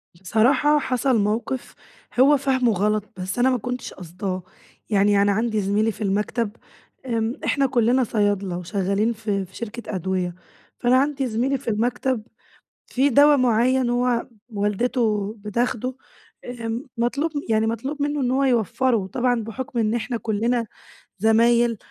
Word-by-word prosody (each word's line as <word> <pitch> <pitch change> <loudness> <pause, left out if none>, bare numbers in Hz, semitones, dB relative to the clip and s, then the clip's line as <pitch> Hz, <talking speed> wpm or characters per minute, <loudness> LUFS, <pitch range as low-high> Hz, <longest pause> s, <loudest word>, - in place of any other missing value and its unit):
بصراحة 255 - +3
حصل 255 -2 +1
موقف 220 +5 -2 0.4
هو 285 +2 +6
فاهمه 260 -3 +1
غلط، 210 +2 +1
بس 190 +5 -4
أنا 260 +2 +4
ما 255 - +2
كنتش 250 +2 -5
قاصداه. 185 +1 -5 0.5
يعني 200 -1 +3
أنا 200 0 +3
عندي 220 0 0
زميلي 210 +3 +1
في 215 - -13
المكتب، 210 +2 -1 0.5
امم، 230 -1 -1
إحنا 275 -1 +2
كلنا 250 0 +2
صيادلة 205 -5 0
وشغالين 200 +4 0
في 205 -3 -2
في 185 - -20
شركة 235 -2 -6
أدوية، 180 -1 -2 0.4
فأنا 250 +1 +4
عندي 275 -1 +1
زميلي 250 +5 0
في 255 - -16
المكتب 245 +2 0 0.6
في 270 +3 +2
دوا 290 +3 +6
مُعيّن 250 0 +2
هو 245 -1 +1 0.3
والدته 210 0 0
بتاخده، 235 +4 -2 0.5
آمم، 235 0 -4
مطلوب 280 +7 0 0.2
يعني 220 0 +2
مطلوب 265 +6 -3
منه 290 0 0
إن 250 0 0
هو 275 +1 +2
يوفّره 235 -3 +1
طبعًا 245 +1 0
بحكم 240 +2 -5
إن 220 0 +1
إحنا 235 +1 -2
كلنا 230 +2 -1 0.5
زمايل 230 +1 +3
230 Hz, 140 wpm, -23 LUFS, 210-255 Hz, 0.6 s, هو